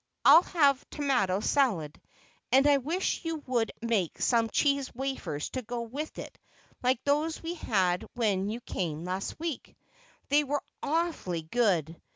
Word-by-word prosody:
I'll 330 - +9
have 285 -7 +2
tomato 245 -10 0
salad, 205 - +1 0.5
and 270 +2 +5
I 290 -1 +6
wish 325 +10 -1
you 330 -1 -2
would 240 -3 0
make 215 -8 0
some 230 -2 +2
cheese 280 0 +1
wafers 265 - -3
to 255 - -3
go 240 0 -4
with 280 +7 -6
it - - -8 0.4
like 255 0 +1
those 300 +3 0
we 330 +1 -3
had 190 - 0
when 205 -4 +1
you 230 +3 -4
came 165 -7 -3
last 185 +8 -4
week. 325 -5 -5 0.5
They 290 +1 +4
were 290 0 -2 0.2
awfully 305 - -1
good. 170 -5 0
250 Hz, 150 wpm, -29 LUFS, 195-290 Hz, 0.5 s, I'll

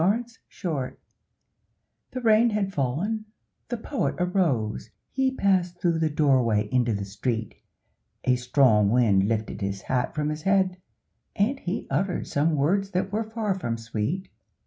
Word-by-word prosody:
THE 170 - +3
POET'S 230 +3 -1 0.2
HAT 145 -8 -2 1.1
The 255 - -5
rain 225 0 +5
had 205 -3 -1
fallen, 175 - -1 0.4
the 240 - -2
Poet 270 +5 -2
arose, 170 - 0 0.2
He 265 0 +2
passed 185 -7 +1
through 170 -2 +1
the 160 -1 +2
doorway 130 -8 +2
into 125 -2 +2
the 100 -2 -2
street, 110 +2 -3 0.7
A 125 - +3
strong 125 -4 +3
wind 105 -5 +3
lifted 110 -1 -2
his 100 0 -3
hat 125 -1 -1
from 150 -1 0
his 155 0 -4
head, 190 0 +1 0.5
And 250 +8 +1
he 185 0 -3
uttered 180 +6 0
some 155 +2 +1
words 190 +8 +1
that 190 +2 0
were 220 +1 -2
far 220 -3 -1
from 120 -12 -3
sweet. 115 - -3
160 Hz, 150 wpm, -26 LUFS, 120-195 Hz, 1.1 s, rain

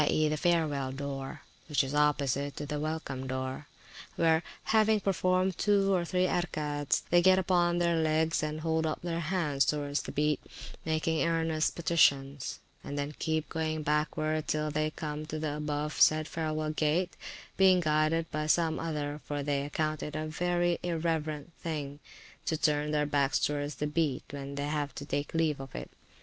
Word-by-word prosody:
e., 155 0 +3
the 150 - 0
Farewell 150 -5 +1
Door, 135 0 -5 0.3
which 150 -1 +3
is 135 +1 -4
opposite 145 -2 +1
to 150 - -4
the 150 0 -3
welcome 150 -4 -3
door; 130 +2 -4 0.5
where, 160 -1 +3 0.2
having 215 0 +3
performed 185 -1 +1
two 200 -1 +3
or 180 -2 +2
three 180 +1 +1
Erkaets, 150 -5 -1
they 175 0 +6
get 185 +1 +6
upon 175 -2 +2
their 170 -1 +2
legs 160 0 +2
and 155 0 -3
hold 160 0 +1
up 155 - -2
their 170 -1 -2
hands 160 -5 +1
towards 145 -1 0
the - - -7
Beat, 150 -1 +1 0.5
making 160 0 0
earnest 165 -2 +1
petitions; 140 -5 +2 0.3
and 145 - -5
then 145 +1 -2
keep 160 -2 0
going 155 -1 -2
backward 155 +1 0
till 155 0 0
they 155 +1 0
come 155 0 -5
to 155 - -4
the 150 -1 -2
above 150 0 -2
said 155 0 +5
farewell 155 -1 -2
gate, 160 +4 0 0.4
being 190 -1 +6
guided 155 0 +2
by 155 0 -2
some 160 0 +2
other, 150 -2 -3
for 145 -1 -3
they 140 -1 0
account 155 +1 -2
it 150 - -5
a 155 0 -2
very 175 +2 0
irreverent 160 -2 -2
thing 145 -3 -4 0.5
to 160 - +1
turn 150 -1 +1
their 150 -1 +1
backs 145 -2 +2
towards 145 -1 -1
the 150 - -2
Beat 150 -3 0
when 140 0 -6
they 145 0 -1 0.2
take 145 +2 -2
leave 160 -3 +1
of 135 -1 -8
it. - - -6
155 Hz, 170 wpm, -30 LUFS, 145-165 Hz, 0.5 s, they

